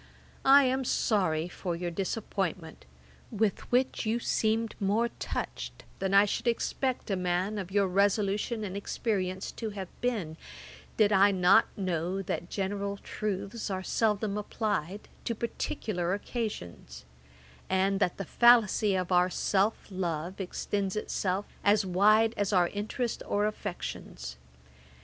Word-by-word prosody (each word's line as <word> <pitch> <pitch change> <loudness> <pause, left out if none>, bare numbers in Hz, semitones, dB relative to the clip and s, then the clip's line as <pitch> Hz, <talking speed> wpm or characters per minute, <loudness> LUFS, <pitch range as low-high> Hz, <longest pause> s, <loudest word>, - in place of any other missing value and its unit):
I 275 +1 +8
am 260 0 +1
sorry 180 -10 +1
for 180 -1 -4
your 175 0 -3
disappointment, 190 - -3 0.4
with 215 -2 -1
which 255 +2 +2
you 225 +1 +1
seem 225 -1 +1
more 210 +4 +1
touched - - -5 0.2
than 190 0 -1
I 200 +1 +7
should 205 - -2
expect 245 0 -1
a - - +2
man 185 +3 -1
of 185 -2 -5
your 200 0 +2
resolution 205 +3 +1
and 195 -2 -4
experience 195 -2 -2
to 225 - -5
have 195 -3 -6
been, 205 -11 -1 0.6
did 215 -2 +4
I 195 +1 +6
not 190 +3 +5
know 185 0 -1
that 175 -1 -4
general 200 0 -2
truths 205 +2 -4
are 190 -1 -3
seldom 210 0 0
applied 205 -3 -2 0.2
to 230 - -1
particular 200 -5 -2
occasions; 90 - -6 0.6
and 190 +1 +2
that 175 - +1
the 195 - -4
fallacy 220 -2 +5
of 185 -1 -2
our 180 0 +4
self 200 +3 +1
love 180 0 -3
extends 195 +1 -2
itself 200 -2 -1 0.2
as 205 0 +4
wide 215 +5 +4
as 205 0 0
our 180 -3 +3
interest 220 +3 -3
or 205 +1 +1
affections. 175 - -5
200 Hz, 135 wpm, -29 LUFS, 185-215 Hz, 0.6 s, I